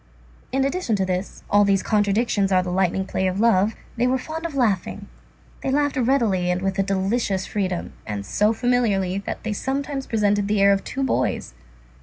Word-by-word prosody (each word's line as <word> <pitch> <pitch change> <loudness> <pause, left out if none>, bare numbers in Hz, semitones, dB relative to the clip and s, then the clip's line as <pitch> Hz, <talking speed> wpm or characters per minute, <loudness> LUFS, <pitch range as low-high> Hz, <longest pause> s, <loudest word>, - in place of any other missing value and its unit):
And, 265 +1 +1
in - - +3
addition 275 -7 -1
to 190 -1 0
this,—all 190 +2 0
these 200 -1 +2
contradictions 205 -1 +1
are 185 -1 +4
the 180 - -4
lightning 190 +1 +1
play 190 0 -1
of 185 +1 -2
love,—they 225 +2 +1
were 260 +1 +2
fond 320 +5 -5
of 310 - -10
laughing, 205 -4 0 0.5
they - - -2
laughed 290 +1 +1
readily 230 -9 +1
and 180 0 +1
with 195 0 -1
a - - +5
delicious 195 0 0
freedom, 190 -5 -3
and 105 -2 -5
so 210 - +2
familiarly 220 -6 +1
that - - -4
they 220 - -2
sometimes 270 +4 -3
presented 205 -2 +1
the 210 0 +1
air 200 0 +6
of 195 - -1
two 270 - -3
boys. 265 - -1
205 Hz, 185 wpm, -23 LUFS, 190-245 Hz, 0.5 s, air